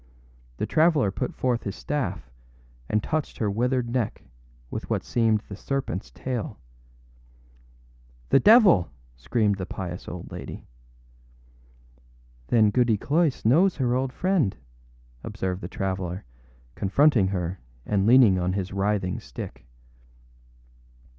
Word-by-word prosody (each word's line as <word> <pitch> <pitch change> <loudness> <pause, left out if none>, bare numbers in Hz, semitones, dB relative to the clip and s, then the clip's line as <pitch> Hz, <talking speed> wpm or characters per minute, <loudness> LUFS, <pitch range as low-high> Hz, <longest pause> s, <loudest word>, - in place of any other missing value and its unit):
The - - -1
traveller 155 - +3
put - - -3
forth 125 -2 0
his 100 - -5
staff 145 -2 -3 0.6
and 105 0 +1
touched 155 -2 -2
her 105 -3 0
withered 125 +3 0
neck 120 -4 -2 0.5
with - - -5
what - - -1
seemed 110 -3 +1
the 105 - -11
serpentâs 125 -2 -4
tail. 120 -5 -4 1.7
âThe 135 - +5
devil!â 205 - +6 0.3
screamed 100 - 0
the 95 - -4
pious 90 -1 -6
old 90 -1 -8
lady. - - -8 1.8
âThen 110 -3 +4
Goody 120 -4 +3
Cloyse 150 - 0
knows 170 - +4
her 125 -3 0
old 130 +1 0
friend?â 175 - 0 0.7
observed 95 -3 -4
the 85 - -5
traveller, 95 -4 -4 0.5
confronting 115 0 +3
her 95 -1 -3 0.3
and 100 -1 +1
leaning 115 -6 +6
on 90 +1 0
his 95 -1 -3
writhing 100 -2 0
stick. - - -9
110 Hz, 120 wpm, -25 LUFS, 95-130 Hz, 1.8 s, devil!â